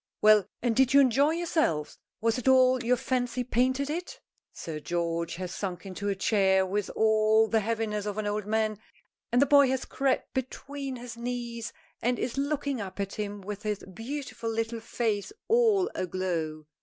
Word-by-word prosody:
"Well, 215 Hz, -2 st, +6 dB, 0.2 s
and 240 Hz, -2 st, +1 dB
did 265 Hz, +1 st, +4 dB
you -, -, +9 dB
enjoy 275 Hz, +3 st, +4 dB
yourself? 315 Hz, -, 0 dB, 0.2 s
Was 230 Hz, +2 st, +1 dB
it 250 Hz, -, -6 dB
all 255 Hz, -1 st, +5 dB
your 250 Hz, +2 st, +3 dB
fancy 250 Hz, -1 st, -1 dB
painted 255 Hz, +3 st, +1 dB
it?" 340 Hz, +4 st, -5 dB, 0.3 s
Sir 155 Hz, -2 st, -6 dB
George 170 Hz, +2 st, -2 dB
has 180 Hz, 0 st, -5 dB
sunk 190 Hz, -1 st, -4 dB
into 195 Hz, +2 st, -4 dB
a 200 Hz, -, 0 dB
chair 190 Hz, -1 st, +3 dB
with 200 Hz, +1 st, -2 dB
all 220 Hz, 0 st, +4 dB
the 225 Hz, 0 st, +2 dB
heaviness 215 Hz, -1 st, -2 dB
of 205 Hz, 0 st, -3 dB
an 215 Hz, -, -2 dB
old 205 Hz, 0 st, -2 dB
man, 215 Hz, -1 st, 0 dB, 0.5 s
and 245 Hz, -, +3 dB
the 280 Hz, -, +6 dB
boy 280 Hz, 0 st, +6 dB
has 265 Hz, 0 st, -1 dB
crept 270 Hz, -1 st, -1 dB
between 270 Hz, +1 st, -4 dB
his 240 Hz, -1 st, -8 dB
knees 235 Hz, -1 st, -4 dB, 0.3 s
and 245 Hz, +1 st, +1 dB
is 240 Hz, -, -3 dB
looking 280 Hz, -2 st, -1 dB
up 195 Hz, 0 st, -7 dB
at 195 Hz, -1 st, -2 dB
him 205 Hz, -1 st, -4 dB
with 205 Hz, +1 st, -6 dB
his 210 Hz, -2 st, -3 dB
beautiful 255 Hz, +1 st, -5 dB
little 225 Hz, +1 st, -2 dB
face 220 Hz, -3 st, -2 dB, 0.2 s
all 440 Hz, -5 st, +4 dB
aglow. 170 Hz, -4 st, -3 dB
225 Hz, 175 wpm, -28 LUFS, 205-260 Hz, 0.5 s, you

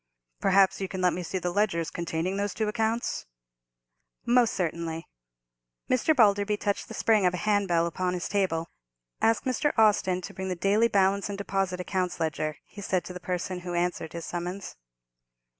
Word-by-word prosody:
"Perhaps 195 Hz, 0 st, +4 dB
you 190 Hz, -, -1 dB
can 190 Hz, -, -5 dB
let 180 Hz, -1 st, +3 dB
me 180 Hz, -, -3 dB
see 180 Hz, +2 st, -3 dB
the 180 Hz, -1 st, -2 dB
ledgers 170 Hz, -5 st, 0 dB
containing 170 Hz, +2 st, -2 dB
those 200 Hz, 0 st, -2 dB
two 220 Hz, -1 st, 0 dB
accounts?" 225 Hz, +2 st, -1 dB, 1.0 s
"Most 240 Hz, -1 st, +3 dB
certainly." 165 Hz, -2 st, -3 dB, 0.8 s
Mr. 255 Hz, +5 st, +3 dB
Balderby 205 Hz, -3 st, +4 dB
touched 205 Hz, -1 st, -2 dB
the -, -, -8 dB
spring 220 Hz, -3 st, +3 dB
of 180 Hz, -, 0 dB
a 180 Hz, -, -5 dB
handbell 195 Hz, -5 st, +2 dB
upon 180 Hz, +1 st, -1 dB
his 180 Hz, -, -3 dB
table. 170 Hz, -5 st, 0 dB, 0.5 s
"Ask 225 Hz, 0 st, +3 dB
Mr. 260 Hz, +3 st, 0 dB
Austin 200 Hz, -4 st, +3 dB
to -, -, -8 dB
bring 190 Hz, 0 st, -4 dB
the 185 Hz, -, -1 dB
daily 205 Hz, +6 st, +3 dB
balance 200 Hz, -1 st, +2 dB
and 200 Hz, -, -4 dB
deposit 195 Hz, -2 st, -1 dB
accounts 180 Hz, -1 st, -2 dB
ledgers," 155 Hz, -1 st, -1 dB
he 205 Hz, -, -11 dB
said 185 Hz, -2 st, 0 dB
to 180 Hz, -, -7 dB
the 180 Hz, -, -7 dB
person 180 Hz, 0 st, -3 dB
who 175 Hz, 0 st, -5 dB
answered 175 Hz, -2 st, -1 dB
his 170 Hz, -1 st, -5 dB
summons. 180 Hz, +3 st, -5 dB
190 Hz, 175 wpm, -27 LUFS, 175-205 Hz, 1.0 s, Perhaps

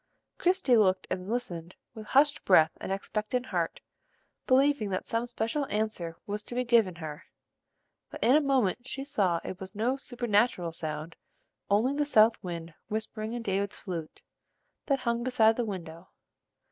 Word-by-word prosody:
Christie 360 Hz, -9 st, +3 dB
looked 190 Hz, -3 st, +3 dB
and 185 Hz, +1 st, -3 dB
listened 185 Hz, -8 st, -4 dB, 0.2 s
with 220 Hz, -2 st, -9 dB
hushed 290 Hz, +2 st, +3 dB
breath 160 Hz, -4 st, +5 dB
and -, -, -4 dB
expectant 215 Hz, +5 st, -2 dB
heart, -, -, -2 dB, 0.7 s
believing 265 Hz, -4 st, +3 dB
that 185 Hz, -1 st, -2 dB
some 230 Hz, +1 st, -1 dB
special 240 Hz, +4 st, -2 dB
answer 205 Hz, -6 st, -2 dB
was 210 Hz, +1 st, -3 dB
to 240 Hz, -, -6 dB
be 250 Hz, -, +1 dB
given 230 Hz, -7 st, +3 dB
her. 155 Hz, -3 st, -7 dB, 0.8 s
But -, -, -7 dB
in 250 Hz, +4 st, +6 dB
a 305 Hz, -, +5 dB
moment 255 Hz, -4 st, +1 dB
she 270 Hz, -, -4 dB
saw 200 Hz, -12 st, +1 dB
it 185 Hz, -, -6 dB
was 190 Hz, 0 st, -7 dB
no 240 Hz, +6 st, 0 dB
supernatural 235 Hz, -8 st, 0 dB
sound, 155 Hz, 0 st, -5 dB, 0.5 s
only 220 Hz, +7 st, +3 dB
the 295 Hz, +1 st, +1 dB
south 225 Hz, -5 st, +4 dB
wind 170 Hz, -2 st, -6 dB
whispering 220 Hz, +1 st, -4 dB
in 240 Hz, -1 st, -4 dB
David's 200 Hz, -1 st, -1 dB
flute 170 Hz, -5 st, -7 dB, 0.6 s
that 275 Hz, -2 st, +1 dB
hung 235 Hz, -1 st, 0 dB
beside 225 Hz, -3 st, +4 dB
the 240 Hz, -, -1 dB
window. 175 Hz, -4 st, -7 dB
220 Hz, 160 wpm, -29 LUFS, 185-250 Hz, 0.8 s, in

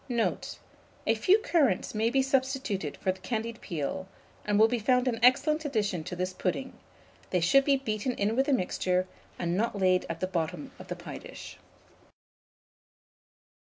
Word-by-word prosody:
Note. 235 Hz, -2 st, -1 dB, 0.5 s
A -, -, +4 dB
few 390 Hz, +2 st, +4 dB
currants 320 Hz, -, +1 dB
may 220 Hz, +1 st, +1 dB
be 265 Hz, +2 st, +2 dB
substituted 260 Hz, -, -1 dB
for 190 Hz, -, 0 dB
the 190 Hz, -, -9 dB
candied 225 Hz, +3 st, -4 dB
peel, 175 Hz, +2 st, -4 dB, 0.4 s
and 210 Hz, -1 st, +1 dB
will 220 Hz, +1 st, +7 dB
be 240 Hz, +1 st, -1 dB
found 250 Hz, +3 st, +2 dB
an 230 Hz, -2 st, 0 dB
excellent 300 Hz, +6 st, +4 dB
addition 205 Hz, -, -1 dB
to 180 Hz, -, -5 dB
this 185 Hz, +1 st, -2 dB
pudding: 200 Hz, +9 st, -2 dB, 0.6 s
they 180 Hz, -, +1 dB
should 225 Hz, +12 st, +5 dB
be 280 Hz, -1 st, +4 dB
beaten 245 Hz, -1 st, -2 dB
in 210 Hz, 0 st, 0 dB
with 265 Hz, +2 st, +2 dB
the 285 Hz, -, +3 dB
mixture, 185 Hz, -3 st, +1 dB, 0.3 s
and 170 Hz, 0 st, -1 dB
not 215 Hz, +1 st, 0 dB
laid 185 Hz, -1 st, +2 dB
at 165 Hz, 0 st, -4 dB
the 185 Hz, -, 0 dB
bottom 185 Hz, -, -3 dB
of -, -, -10 dB
the -, -, -4 dB
pie -, -, -8 dB
dish. -, -, -10 dB
220 Hz, 170 wpm, -29 LUFS, 185-265 Hz, 0.6 s, will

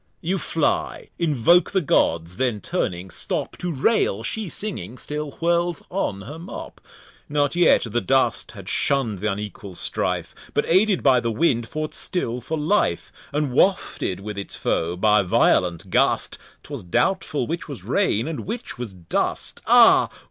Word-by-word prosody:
You 185 Hz, +3 st, -1 dB
fly, 160 Hz, -2 st, -1 dB
invoke 170 Hz, +2 st, +4 dB
the 195 Hz, -, +1 dB
Gods; 85 Hz, -, +1 dB
then 125 Hz, -5 st, 0 dB
turning, 95 Hz, -, -3 dB
stop -, -, -3 dB
To 180 Hz, -, -2 dB
rail; 135 Hz, -, +1 dB
she 215 Hz, -, -3 dB
singing, 150 Hz, -, -5 dB
still 150 Hz, +2 st, -4 dB
whirls 170 Hz, 0 st, 0 dB
on 140 Hz, -, -2 dB
her 145 Hz, +11 st, -8 dB
Mop. 170 Hz, -, -9 dB, 0.5 s
Not 145 Hz, +1 st, +1 dB
yet, 175 Hz, -, +5 dB
the 120 Hz, +1 st, -1 dB
Dust 135 Hz, +6 st, +1 dB
had -, -, -11 dB
shun'd 120 Hz, -8 st, 0 dB
th'unequal 105 Hz, -2 st, -4 dB
Strife, -, -, -2 dB, 0.2 s
But -, -, +2 dB
aided 190 Hz, +2 st, +3 dB
by 130 Hz, -3 st, +5 dB
the 115 Hz, -, -2 dB
Wind, 115 Hz, -1 st, +1 dB
fought 155 Hz, +3 st, -4 dB
still 125 Hz, -9 st, -2 dB
for 155 Hz, +6 st, -3 dB
Life; 155 Hz, -, 0 dB, 0.2 s
And 145 Hz, -2 st, -1 dB
wafted 125 Hz, -, +1 dB
with 105 Hz, 0 st, -5 dB
its 100 Hz, -, -6 dB
Foe 85 Hz, +2 st, -1 dB
by 105 Hz, +2 st, +4 dB
violent 90 Hz, -2 st, +2 dB
Gust, -, -, +2 dB, 0.2 s
'Twas -, -, -7 dB
doubtful 85 Hz, -, 0 dB
which -, -, -4 dB
was -, -, -7 dB
Rain, 110 Hz, +7 st, +1 dB
and 160 Hz, -2 st, -4 dB
which 225 Hz, -, -5 dB
was 115 Hz, -6 st, -6 dB
Dust. 85 Hz, -2 st, -2 dB
Ah! -, -, +7 dB
130 Hz, 155 wpm, -23 LUFS, 100-170 Hz, 0.5 s, Ah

